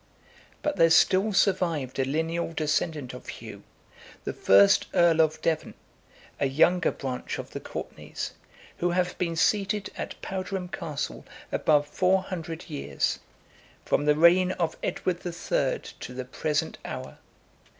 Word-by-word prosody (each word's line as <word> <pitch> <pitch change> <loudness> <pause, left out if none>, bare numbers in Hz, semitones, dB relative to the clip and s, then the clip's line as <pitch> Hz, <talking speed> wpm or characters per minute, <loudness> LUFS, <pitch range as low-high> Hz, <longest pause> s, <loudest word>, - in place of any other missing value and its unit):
But 295 - -1
there 165 - +6
still 190 +5 +4
survived 170 -10 +1
a - - +4
lineal 160 +4 -1
descendant 155 -3 -1
of 125 - -10
Hugh, - - -8 0.6
the - - -3
first 100 +1 +5
earl 170 -2 +5
of 155 0 +1
Devon, 160 -2 -1 0.6
a 140 - +2
younger 165 +6 +3
branch 130 -2 -4
of - - -7
the - - -5
Courtenays, - - -6 0.5
who 175 - +1
have 180 0 0
been 170 -2 -1
seated 200 +3 +1
at - - -6
Powderham 190 -1 -4
Castle 150 -4 -4 0.3
above 150 -1 +3
four 185 +5 +2
hundred 165 -4 -6
years, 70 0 -2 0.7
from 145 - +1
the 150 0 +4
reign 180 +3 +5
of 165 -2 -1
Edward 180 -2 -1
the 175 - -5
Third - - -1 0.2
to 125 - -8
the 130 0 -4
present 150 +4 -2
hour. - - -7
165 Hz, 140 wpm, -27 LUFS, 150-185 Hz, 0.7 s, there